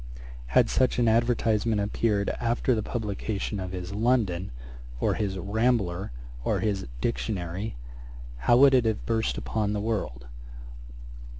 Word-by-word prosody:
Had - - +4
such 95 - +2
an 120 -1 +3
advertisement 115 -1 +2
appeared 100 0 0
after 120 +2 +1
the 110 - 0
publication 105 -2 -3
of 90 -1 -4
his 90 +1 -5
London, 105 -5 +1 0.5
or - - +2
his 100 -3 -2
Rambler, 100 -2 0 0.3
or - - +1
his 100 -8 -1
Dictionary, 100 -3 -2 0.6
how 120 - +4
would 135 +1 +7
it 125 -3 +4
have 110 -2 -1
burst 115 -1 0
upon 105 -2 -1
the 105 - -1
world! 100 - -3
105 Hz, 130 wpm, -27 LUFS, 95-115 Hz, 0.6 s, would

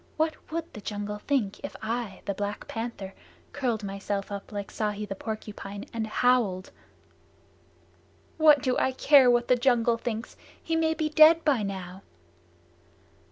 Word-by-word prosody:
What 315 0 +1 0.2
would 330 0 -4
the 210 - -9
jungle 205 0 -4
think 220 -5 -1
if - - -6
I, 225 -3 -4
the 200 - -1
Black 205 +1 -4
Panther, 225 -4 -5 0.4
curled 240 -6 -1
myself 195 0 -4
up 200 -1 -7
like 205 -1 -5
Ikki 210 -1 -2
the 195 - -5
Porcupine, 205 -1 -7
and 225 -1 -2
howled?" 215 -5 +1 1.7
"What 300 -3 +6
do 255 -2 +1
I 260 - +1
care 270 -1 +6
what 240 0 +3
the 250 - +5
jungle 240 -2 +2
thinks? 230 0 -5 0.2
He 330 - -2
may 320 0 +1
be 310 0 -1
dead 315 +2 +6
by 275 -7 +3
now." 190 -2 -5
225 Hz, 150 wpm, -27 LUFS, 205-265 Hz, 1.7 s, What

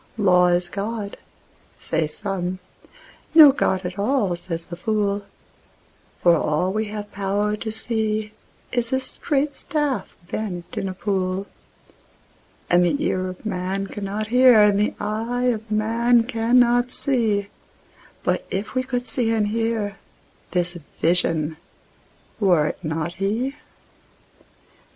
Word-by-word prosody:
Law 180 -4 +5
is 175 0 +2
God, 205 +2 -4 0.6
say 160 -1 -1
some: 185 +2 -3 0.8
no 305 -3 +11
God 190 -8 0
at 180 +2 -5
all, 205 -4 +1
says 170 -1 -5
the 175 - -7
fool; 205 +1 -1 1.0
For 175 -1 +6
all 165 +4 0
we 215 +1 0
have 210 0 -6
power 205 +2 0
to 220 +1 -4
see 220 -1 -1 0.4
is 240 -1 -1
a 260 - +2
straight 280 +2 -1
staff 295 -3 -2
bent 180 -5 -5
in 195 -3 -2
a 185 - -6
pool; 190 -1 -1 1.2
And 175 0 +4
the 175 - +2
ear 185 0 0
of 185 +3 -9
man 190 -1 -2
cannot 205 +2 -4
hear, 250 -3 +7
and 205 -1 +4
the 210 - +1
eye 230 +4 0
of 220 0 -8
man 230 +2 +3
cannot 240 +1 +3
see; 220 -7 0 0.7
But - - 0
if 200 +3 -3
we 255 - +1
could 250 -1 -3
see 230 -1 0
and 215 -2 +1
hear, 225 -2 -1 0.5
this 175 -1 -1 0.2
Vision—were 165 +2 -1
it - - -8
not 160 +1 -2
He? 235 +8 0
210 Hz, 125 wpm, -23 LUFS, 185-230 Hz, 1.2 s, no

